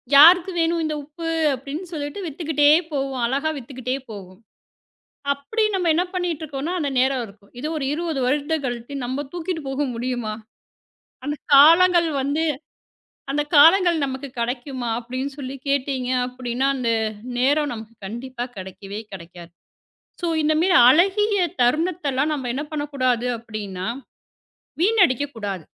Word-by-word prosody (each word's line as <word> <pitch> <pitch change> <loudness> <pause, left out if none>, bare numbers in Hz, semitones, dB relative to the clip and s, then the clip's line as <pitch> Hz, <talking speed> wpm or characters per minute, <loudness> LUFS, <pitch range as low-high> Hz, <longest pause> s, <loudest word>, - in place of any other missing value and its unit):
யாருக்கு 350 +5 +8
வேண்டும் 330 0 +1
இந்த 305 -1 -2
உப்பு 330 +3 -8 0.3
அப்படி 275 +2 -7
என்று 360 +3 -6
சொல்லிட்டு 290 +4 -5
விற்றுக்கொண்டே 295 -2 +2 0.2
போவோம். 270 -3 -2
அழகாக 280 +6 0
விற்றுக்கொண்டே 255 0 -4
போவாள். 190 -2 -10 0.9
அப்படி 430 +11 -2
நம்ம 360 -3 +1
என்ன 350 +3 +2
பண்ணிக்கிட்டு 345 -4 -2
இருக்கோம்னா 290 +4 -4
அந்த 285 -3 -1
நேரம் 260 -1 +2
இருக்கும். 200 -1 -18
இதை 300 - -3
ஒரு 275 - -2
20 325 -3 -2
வருடங்கள் 290 +3 0
கழித்து 245 +2 -4
நம்மால் 265 +2 -4
தூக்கிக்கொண்டு 330 -4 -4
போக 280 +2 -1
முடியுமா? 240 -3 -3 0.9
அந்தக் 295 +1 -4
காலங்கள் 335 +4 +7
வந்து 285 +4 0 0.9
அந்தக் 295 +2 -2
காலங்கள் 340 +2 +6
நமக்குக் 265 -1 -6
கிடைக்குமா 245 +1 -3
அப்படி 245 +2 -6
என்று 275 -1 -6
கேட்டீர்களென்றால் 255 -1 -1
அந்த 240 -3 -1 0.5
நேரம் 290 +3 +2
நமக்குக் 225 -2 -10
கண்டிப்பாக 245 +3 -6
கிடைக்கவே 195 +2 -8
கிடைக்காது. 170 -1 -10 0.7
சோ 345 - -1
இந்த 310 +1 +2
மாதிரி 360 +1 +3
அழகிய 395 +6 +4 0.2
தருணத்தை 310 +5 +1
எல்லாம் 275 +4 +1
நாம் 260 -5 -3
என்ன 280 +4 -3
பண்ணக்கூடாது 255 -5 -1
அப்படின்னா 205 -5 -6 1.0
வீணடிக்கக்கூடாது. 270 - +1
275 Hz, 130 wpm, -22 LUFS, 245-315 Hz, 1.0 s, யாருக்கு